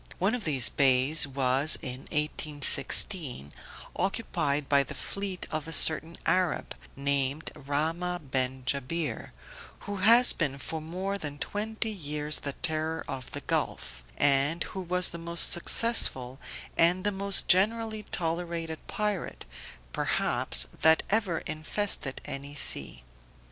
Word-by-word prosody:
One 195 +5 0
of 245 -4 -4
these 135 -6 +3
bays 135 +2 +5
was 135 +2 +1
in 130 +1 -4
1816, 150 - +1 0.4
occupied 160 -8 -2
by 140 0 +4
the 140 - -6
fleet 195 -2 -5
of 155 0 -4
a - - -7
certain 160 +1 +2
Arab, 185 -2 0 0.2
named 140 +1 -2
Rahmah 160 +2 -4
ben 130 0 -1
Jabir, 140 +5 -3 0.5
who 205 0 -6
has 230 +6 +6
been 140 -5 -2
for 155 +4 -5
more 185 +5 -4
than 150 -4 -7
twenty 220 +6 -3
years 150 -5 -2
the 140 - -5
terror 160 0 -3
of 130 -2 -7
the - - -7
gulf, - - -4
and 145 +4 +2
who 190 - -7
was 180 0 +1
the 170 - -9
most 170 0 +2
successful 145 - +3 0.4
and 175 +2 +3
the 205 - 0
most 200 0 +1
generally 220 +3 +2
tolerated 165 -1 -4
pirate, 210 -3 -4 0.5
perhaps, - - +1 0.2
that 160 0 +5
ever 200 -6 0
infested 155 -2 0
any 140 +1 -7
sea. 60 - +1
160 Hz, 130 wpm, -28 LUFS, 140-185 Hz, 0.5 s, has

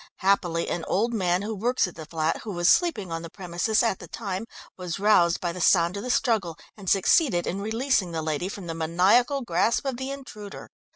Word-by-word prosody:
Happily 175 -4 +1
an 170 - -3
old 230 +5 0
man 185 -3 +1
who 220 +2 -3
works 235 +2 +1
at 180 - -9
the 160 -2 -10
flat, 160 -1 -1
who 215 - -7
was 175 -2 0
sleeping 225 - +2
on 165 0 -3
the 165 - -8
premises 185 +5 -1
at 225 -5 0
the - - -10
time, 200 -1 -5 0.3
was 180 -3 -5
roused 195 -4 +3
by 175 - -2
the 180 +1 -7
sound 170 +1 +4
of 200 - -4
the 250 - -6
struggle, 215 - +1 0.2
and 195 -4 -5
succeeded 195 - +3
in 195 +3 -3
releasing 220 -3 0
the 160 -1 -3
lady 155 +4 -2
from 200 -2 -7
the 165 - -4
maniacal 190 - +2
grasp 220 +6 +1
of 265 -3 -2
the 260 +1 -4
intruder. 215 -7 -9
195 Hz, 215 wpm, -25 LUFS, 170-225 Hz, 0.3 s, sound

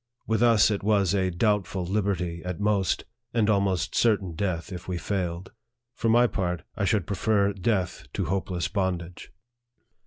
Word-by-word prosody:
With 110 0 0
us 115 -3 +5
it 100 - -1
was 100 -3 +2
a 95 -2 +1
doubtful 95 -1 0
liberty 95 -3 -1
at 90 -2 -4
most, 100 -3 +1 0.3
and 110 -3 +3
almost 100 -5 +1
certain 100 -6 +2
death 85 +1 -2
if 90 - -8
we 90 -1 -2
failed. 90 -1 -3 0.4
For 115 -2 -1
my 120 +2 +5
part, 90 - -2
I 100 - -1
should 95 -1 +1
prefer 100 0 +1
death 95 - -1
to 95 - -1
hopeless 90 0 -1
bondage. 90 -3 -3
95 Hz, 155 wpm, -26 LUFS, 90-105 Hz, 0.4 s, us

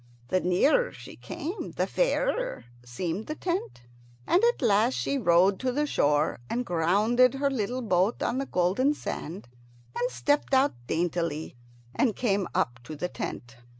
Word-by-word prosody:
The 185 - +2
nearer 275 - +2
she - - -11
came 345 +8 -6
the - - 0
fairer - - 0 0.2
seemed 165 - -4
the 305 - -4
tent, 325 - -3 0.4
and 365 - +3
at 475 - +1
last 225 +3 +3
she 280 - -1
rowed 185 -1 +4
to 260 -1 0
the 295 +4 0
shore 150 - +1
and 245 +1 -1
grounded 210 +9 +3
her 280 +1 0
little 250 +1 -2
boat 190 +1 +1
on 245 +2 0
the 275 - -3
golden 200 +12 +1
sand, 175 - -6 0.5
and 245 +1 0
stepped 290 0 +1
out 265 +2 +4
daintily 165 -3 -2 0.4
and 235 -5 +1
came 200 -6 0
up 120 -1 0
to 155 - -7
the 180 +4 -3
tent. 120 -8 -6
215 Hz, 155 wpm, -27 LUFS, 175-270 Hz, 0.5 s, rowed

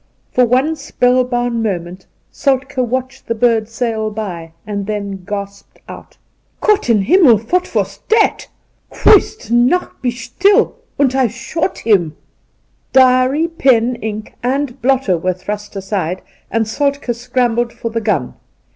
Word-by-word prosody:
For 250 - +4
one 265 +7 +2
spellbound 245 -4 0
moment 185 -3 -4 0.2
Soltke 265 -1 -1
watched 260 +2 -3
the 230 - -1
bird 225 -1 +2
sail 225 -2 -2
by, 180 -7 -6
and 200 -1 -4
then 200 -3 -4
gasped 200 0 -7
out: - - -11 0.2
' - - -44
Gott 425 - +2
in 215 -4 +3
Himmel 305 - +5
I - - -15
what 360 +9 -1
woss - - -1
dat? 440 0 +2 0.4
Christnacht, 315 - +2
be 250 - 0
shtill, 355 - +2 0.2
und 270 -3 +2
I 265 -2 +2
shot 265 - -3
him.' 185 -8 +1 0.7
Diary, 260 +4 +4
pen, 255 -7 +2
ink 215 -1 -6
and 260 +1 -2
blotter 250 -8 +2
were 185 +2 0
thrust 205 +3 -6
aside, 190 -2 -3 0.3
and 225 -1 0
Soltk6 280 +2 -1
scrambled 240 0 0
for 230 - -6
the 230 0 -2
gun. 185 - -1
240 Hz, 140 wpm, -16 LUFS, 210-265 Hz, 0.7 s, Himmel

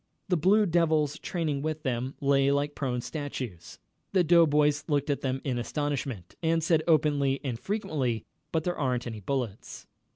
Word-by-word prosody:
The 180 - +3
Blue 200 +6 +4
Devils 160 -4 +2
training 155 -6 -2
with 155 +1 -3
them 130 -1 -2
lay 140 -1 +3
like 145 +1 +1
prone 125 -4 -2
statues. 125 - -6 0.4
The 185 -2 +4
doughboys 150 -3 +4
looked 145 -1 +1
at 140 - -2
them 130 0 -2
in 125 -3 -1
astonishment, 135 - -3
and 165 -1 +1
said, 160 -1 +3
openly 145 -4 +3
and 125 -5 -3
frequently: 140 - -2 0.3
"But 160 -1 0
there 175 0 -2
ain't 125 -4 0
any 115 -3 -5
bullets." 120 -1 -4
145 Hz, 160 wpm, -28 LUFS, 130-160 Hz, 0.4 s, Blue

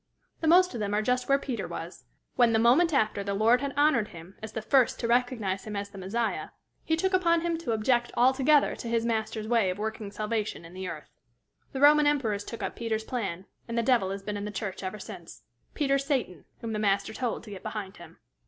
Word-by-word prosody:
The 320 - -1
most 360 +1 +5
of 235 - -4
them 205 -1 -1
are 210 - +2
just 250 +3 0
where 275 - +5
Peter 260 -4 -4
was, - - -8 0.3
when, 240 -2 +4
the - - +4
moment 255 +10 +4
after 215 -7 +1
the 200 0 -2
Lord 230 +5 +4
had 280 -1 -2
honored 290 -7 +3
him 170 +1 -12
as 220 0 -7
the 220 - -3
first 260 0 +3
to 230 - -1
recognize 235 -6 0
him 215 -1 -5
as 200 0 -4
the 195 - -10
Messiah, 225 +5 -2 0.3
he 320 - +1
took 375 +4 0
upon 340 -3 +3
him 340 0 0
to 280 -8 -3
object 240 +2 +1
altogether 265 +4 +4
to - - -7
his 230 0 0
Master's 220 -1 -2
way 225 -5 +3
of 185 - -3
working 215 -1 -4
salvation 215 -4 -3
in 165 - -12
the 185 0 -5
earth. 155 -4 -8 0.6
The 265 - -4
Roman 295 +1 +7
emperors 225 -9 +1
took 230 - -7
up - - -3
Peter's 225 -2 -2
plan, 195 -7 -4 0.2
and 235 0 -4
the 235 - +2
devil 230 -6 +3
has 195 0 -5
been 210 0 -3
in 205 - -4
the - - -4
church 205 -2 -5
ever 190 +2 -4
since - - -10 0.3
Peter's 275 -2 +1
Satan, 230 - -2 0.2
whom 225 -1 -4
the 215 - -2
Master 200 0 +1
told 245 0 -3
to 215 - -11
get 195 - -8
behind 210 -3 -6
him. - - -13
225 Hz, 230 wpm, -28 LUFS, 205-260 Hz, 0.6 s, Roman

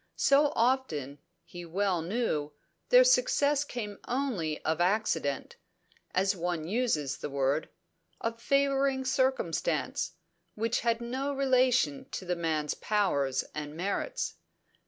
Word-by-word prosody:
So 285 +1 +4
often, 195 - 0 0.3
he 175 0 -9
well 180 +1 0
knew, 165 -6 -1 0.4
their - - +8
success 295 - +3
came 215 -7 -6
only 230 - -1
of 160 +2 0
accident 175 -7 0 0.6
as 195 +2 +2
one 170 -2 -2
uses 180 - 0
the - - -4
word: 140 +2 0 0.5
of 230 0 -3
favouring 275 0 +2
circumstance, 185 - 0 0.4
which 225 +2 0
had 235 -1 0
no 260 +4 -2
relation 255 - +2
to 190 - -4
the 180 0 -1
man's 155 -3 -1
powers 140 -11 0
and 150 0 -6
merits. 200 - -2
205 Hz, 115 wpm, -30 LUFS, 160-260 Hz, 0.6 s, their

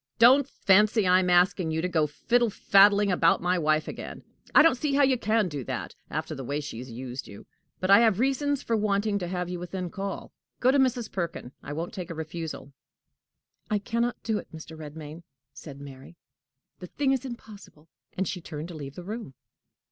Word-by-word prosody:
"Don't 260 +4 +6
fancy 210 +1 +3
I 180 0 +5
am 180 -1 0
asking 180 -1 +3
you 160 0 -1
to 175 - 0
go 160 -4 +1
fiddle 235 +10 +1
faddling 200 0 +4
about 165 -2 +3
my 180 +1 +1
wife 155 -1 +1
again: - - -7 0.3
I 295 - +9
don't 330 - +6
see 275 +3 -1
how 285 - +4
you 265 -1 +4
can 220 -3 +1
do 145 -5 -5
that, - - -5 0.2
after 155 +2 -4
the 135 -3 -6
way 145 +4 -2
she 145 -6 -7
has 130 +1 -8
used 125 +2 -7
you! 100 - -12 0.3
But 185 +1 0
I 200 - +9
have 220 -4 +3
reasons 275 +2 0
for 230 - 0
wanting 205 -1 0
to 175 - -4
have 180 0 -3
you 180 0 -5
within 180 0 -5
call. 195 -1 -5 0.3
Go 255 - +4
to 280 - +3
Mrs. 250 -4 +1
Perkin. 170 -8 -4
I 145 - -7
won't 165 +3 -4
take 180 -3 -6
a 165 - -5
refusal." 160 -3 -6 1.0
"I 210 - +2
can 230 +3 -2
not 240 0 0
do 220 -2 0
it, - - -13
Mr. 160 0 -10
Redmain," 155 +1 -9 0.3
said 140 -3 -10
Mary; 140 +3 -12 0.6
"the 180 - -8
thing 275 +7 0
is 265 -1 0
impossible." 210 - -11 0.3
And 190 0 0
she 180 0 -4
turned 155 0 -7
to - - -8
leave 140 -3 -8
the 180 - -8
room. 210 - -7
180 Hz, 210 wpm, -27 LUFS, 155-220 Hz, 1.0 s, I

